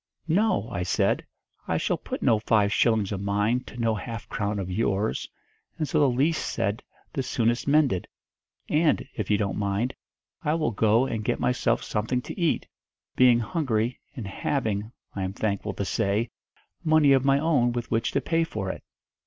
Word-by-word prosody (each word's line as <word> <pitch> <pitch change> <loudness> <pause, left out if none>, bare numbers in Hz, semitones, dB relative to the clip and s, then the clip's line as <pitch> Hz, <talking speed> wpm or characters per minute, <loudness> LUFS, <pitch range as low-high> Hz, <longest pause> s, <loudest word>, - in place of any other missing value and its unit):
'No!' 175 - +2
I 90 - -2
said, 90 -1 +1 0.4
'I - - +1
shall - - 0
put - - -6
no 110 - +4
five 105 -2 +2
shillings 110 -4 +2
of 100 -2 -3
mine 105 +4 +1
to - - -11
no 115 -2 +1
half 110 +1 -6
crown 105 0 -2
of 95 -2 -3
yours, 100 +1 0 0.5
and 155 -3 -1
so 155 - +1
the 145 -2 +5
least 145 +6 +1
said 100 +5 -1 0.3
the 135 - -1
soonest 120 -1 0
mended. 140 - +3 0.6
And, 155 -1 +2
if 105 -4 -4
you 105 - +4
don't 100 -2 -1
mind, 100 +5 0 0.5
I 150 -1 +1
will 155 -6 0
go 110 +3 +3
and 115 -5 -3
get - - 0
myself 120 -1 +1
something 115 +4 -1
to - - -7
eat, 170 -3 +1 0.5
being 125 -2 +6
hungry, 120 -4 -1 0.2
and 120 -6 -5
having, 110 -1 -2 0.2
I 100 - -3
am 95 0 -2
thankful 100 -1 -2
to - - -2
say, 105 +4 0 0.5
money 155 -3 +5
of 135 -1 +3
my 135 0 +4
own 140 -5 +2
with 120 -1 -4
which 115 0 +1
to - - +1
pay 165 0 +1
for 105 -12 -3
it.' - - -10
115 Hz, 180 wpm, -26 LUFS, 105-140 Hz, 0.6 s, being